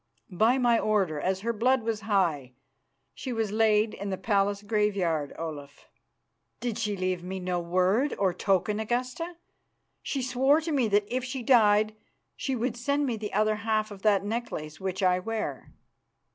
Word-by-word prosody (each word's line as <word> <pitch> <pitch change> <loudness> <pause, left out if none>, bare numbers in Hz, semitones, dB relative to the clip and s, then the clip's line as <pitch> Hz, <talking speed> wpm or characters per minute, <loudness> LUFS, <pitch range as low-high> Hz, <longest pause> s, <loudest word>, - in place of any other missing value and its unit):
"By 220 +8 +3
my 240 -3 +3
order, 195 -8 +1
as 190 +3 -1
her 235 +2 -1
blood 250 +3 +2
was 220 -1 -2
high, 170 - 0 0.6
she 260 - -6
was 225 -3 -1
laid 215 0 +3
in 200 0 -5
the 190 - -2
palace 200 -1 0
graveyard, 200 -8 0
Olaf." 145 -3 -7 0.7
"Did 235 -2 -3
she 210 -3 -1
leave 185 -1 -1
me 190 +1 -5
no 180 -1 -1
word 185 +10 +1
or 190 -3 +1
token, 195 +3 +1
Augusta? 250 +10 -2 0.7
She 270 -3 -3
swore 265 +4 +3
to 325 0 -3
me 265 -6 +2
that 205 0 +2
if 255 - -1
she 255 0 -4
died 215 -3 +4 0.4
she 270 - -2
would 240 0 -1
send 280 +4 0
to - - +1
me 245 -4 -1
the 210 -1 -5
other 215 +1 +2
half 215 0 -1
of 200 -1 -10
that 200 -2 +3
necklace 205 -9 -4
which 190 0 -3
I 180 -1 +3
wear." 225 +3 -4
210 Hz, 175 wpm, -28 LUFS, 190-235 Hz, 0.7 s, died